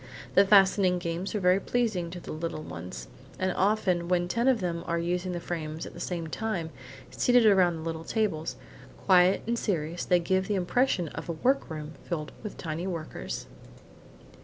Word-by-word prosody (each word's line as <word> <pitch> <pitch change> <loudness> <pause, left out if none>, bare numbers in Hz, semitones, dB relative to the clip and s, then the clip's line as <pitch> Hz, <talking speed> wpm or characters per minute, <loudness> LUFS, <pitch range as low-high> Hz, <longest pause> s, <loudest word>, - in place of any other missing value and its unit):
The 195 - +6
fastening 195 -2 +5
games 175 +3 -3
are - - +1
very 180 0 +4
pleasing 215 -7 -1
to 175 +1 -7
the - - -8
little 155 0 -4
ones, 80 -7 -7 0.3
and 185 0 0
often 185 -3 +1
when 175 0 +1
ten 235 +7 0
of 260 -3 +4
them 170 -3 -2
are 170 - 0
using 180 +2 -1
the 175 - -3
frames 160 -2 -4
at - - -9
the - - -10
same 175 -2 -3
time, 170 -2 -3 0.4
seated 245 -2 +4
around 185 -5 +5
the 160 - -6
little 165 0 -4
tables, 185 -7 -1 0.5
quiet 180 +1 +5
and 235 +1 -1
serious, 170 -3 -2
they 180 - +4
give 190 +2 0
the 210 - 0
impression 185 - +1
of - - -7
a - - 0
workroom 160 - -1
filled 155 -4 -4
with 210 - -7
tiny 165 +2 -4
workers. 165 -4 -5
180 Hz, 180 wpm, -28 LUFS, 165-195 Hz, 0.5 s, The